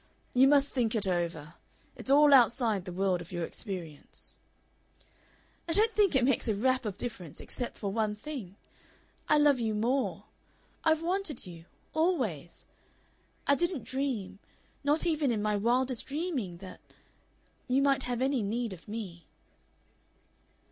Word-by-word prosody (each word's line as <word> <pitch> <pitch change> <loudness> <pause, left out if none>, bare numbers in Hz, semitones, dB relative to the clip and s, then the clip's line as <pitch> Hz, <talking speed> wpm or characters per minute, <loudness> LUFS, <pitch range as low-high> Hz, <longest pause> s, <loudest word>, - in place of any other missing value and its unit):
You 260 +2 +6
must 285 0 +5
think 235 -4 +1
it 215 -2 +1
over. 170 -4 -2 0.4
It's - - -6
all 290 +1 +7
outside 235 -6 +4
the 180 - -6
world 185 -1 0
of 170 - -11
your 175 -1 -3
experience." 170 -9 -7 1.3
"I - - +2
don't 445 +4 +3
think 405 -7 +3
it 255 -2 +4
makes 260 -2 +1
a 220 - +1
rap 255 +4 +1
of 205 -3 -4
difference, 185 - -6
except 245 - -5
for 200 -2 -3
one 215 0 0
thing. 210 -6 -7 0.7
I 300 - +5
love 290 -3 +4
you 220 -2 -1
more. 250 +5 0 0.6
I've 320 0 +2
wanted 360 - -2
you 170 -2 -11 0.3
always. 250 - -1 0.8
I 280 - +4
didn't 340 - 0
dream, 260 -8 -3 0.4
not 295 +4 +2
even 310 -4 +1
in 230 -3 0
my 210 0 +1
wildest 245 +4 0
dreaming, 275 - -3
that 185 +1 -10 0.9
you 265 +2 +2
might 275 -1 +3
have 245 0 -2
any 265 -2 +1
need 225 +1 -2
of 180 - -13
me." 195 -6 -7
240 Hz, 150 wpm, -30 LUFS, 195-280 Hz, 1.3 s, all